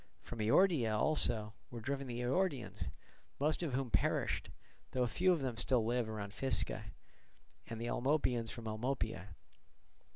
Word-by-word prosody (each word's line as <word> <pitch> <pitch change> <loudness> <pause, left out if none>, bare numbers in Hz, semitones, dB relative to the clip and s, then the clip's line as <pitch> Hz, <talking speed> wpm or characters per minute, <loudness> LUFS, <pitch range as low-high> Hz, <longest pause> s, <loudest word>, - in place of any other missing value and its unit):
From 120 - -7
Eordia 115 - +4
also 110 -7 +2 0.2
were 120 - -6
driven 140 +3 -3
the 120 0 -3
Eordians, 125 - 0 0.5
most 150 +4 +1
of 160 -6 -2
whom 130 -3 -1
perished, - - +1 0.4
though 125 - +2
a - - +2
few 185 +10 +3
of 170 -5 +2
them 125 -4 -2
still 120 -1 +2
live 120 0 +1
round 105 -2 -5
Physca, 135 +2 0 0.8
and 115 - -5
the 115 - -3
Almopians 120 -2 +1
from 115 -2 -7
Almopia. 110 -5 -2
120 Hz, 150 wpm, -36 LUFS, 110-135 Hz, 0.8 s, Eordia